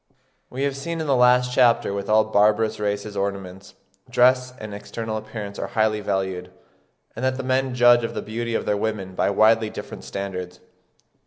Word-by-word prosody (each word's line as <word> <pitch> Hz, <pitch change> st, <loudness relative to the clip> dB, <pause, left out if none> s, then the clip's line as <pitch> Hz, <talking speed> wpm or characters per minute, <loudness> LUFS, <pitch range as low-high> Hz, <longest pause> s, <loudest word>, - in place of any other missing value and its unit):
We 130 Hz, +2 st, -4 dB
have 140 Hz, -1 st, 0 dB
seen 165 Hz, +5 st, -4 dB
in 160 Hz, -, -2 dB
the 140 Hz, -2 st, +2 dB
last 125 Hz, 0 st, +4 dB
chapter 125 Hz, -2 st, +4 dB
that -, -, -3 dB
with 100 Hz, +1 st, -4 dB
all 110 Hz, 0 st, +5 dB
barbarous 110 Hz, +1 st, +2 dB
races 105 Hz, 0 st, -3 dB
ornaments, 95 Hz, -1 st, -5 dB, 0.3 s
dress, 125 Hz, +1 st, +3 dB
and 110 Hz, -1 st, -8 dB
external 110 Hz, +2 st, -5 dB
appearance 110 Hz, -2 st, -6 dB
are -, -, -3 dB
highly 110 Hz, -1 st, +1 dB
valued; 95 Hz, -3 st, -2 dB, 0.7 s
and 115 Hz, -, -6 dB
that 130 Hz, 0 st, 0 dB
the 135 Hz, -, -4 dB
men 130 Hz, 0 st, 0 dB
judge 120 Hz, -1 st, +5 dB
of 115 Hz, -, -4 dB
the -, -, -3 dB
beauty 115 Hz, +1 st, -3 dB
of -, -, -1 dB
their 105 Hz, -, +1 dB
women 100 Hz, -3 st, -3 dB
by -, -, +1 dB
widely 110 Hz, +2 st, +3 dB
different -, -, -8 dB
standards. 90 Hz, -2 st, -6 dB
110 Hz, 185 wpm, -23 LUFS, 100-125 Hz, 0.7 s, all